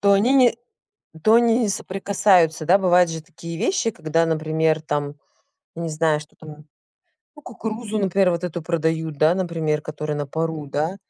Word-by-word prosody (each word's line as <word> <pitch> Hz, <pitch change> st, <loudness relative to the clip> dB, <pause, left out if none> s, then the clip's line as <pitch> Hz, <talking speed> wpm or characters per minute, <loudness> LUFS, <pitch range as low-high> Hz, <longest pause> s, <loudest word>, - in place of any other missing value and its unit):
то 200 Hz, 0 st, +4 dB
они 210 Hz, +6 st, +3 dB
не 250 Hz, -4 st, +4 dB, 0.7 s
то 220 Hz, +1 st, +5 dB
они 235 Hz, 0 st, +4 dB
не 220 Hz, -, +1 dB
соприкасаются. 190 Hz, -4 st, +1 dB
Да, 180 Hz, +5 st, +5 dB
бывают 180 Hz, -2 st, +4 dB
же 160 Hz, -, -5 dB
такие 170 Hz, +1 st, -9 dB
вещи, 235 Hz, -, 0 dB
когда, 165 Hz, -2 st, 0 dB
например, 160 Hz, 0 st, 0 dB
там, 145 Hz, -2 st, -3 dB, 0.6 s
не 165 Hz, 0 st, -4 dB
знаю, 155 Hz, -1 st, +1 dB
что 150 Hz, 0 st, -15 dB
там, 155 Hz, -, -13 dB, 0.9 s
ну, 295 Hz, -, -14 dB
кукурузу, 225 Hz, -3 st, -5 dB
например, 195 Hz, -1 st, +2 dB
вот 170 Hz, 0 st, -2 dB
эту 175 Hz, -1 st, -4 dB
продают, 160 Hz, -1 st, -2 dB
да, 155 Hz, +4 st, +4 dB
например, 165 Hz, -5 st, -2 dB
которая 150 Hz, -1 st, -5 dB
на 145 Hz, 0 st, -3 dB
пару, 160 Hz, +1 st, -3 dB
да? 155 Hz, +6 st, -2 dB
165 Hz, 170 wpm, -22 LUFS, 155-195 Hz, 0.9 s, то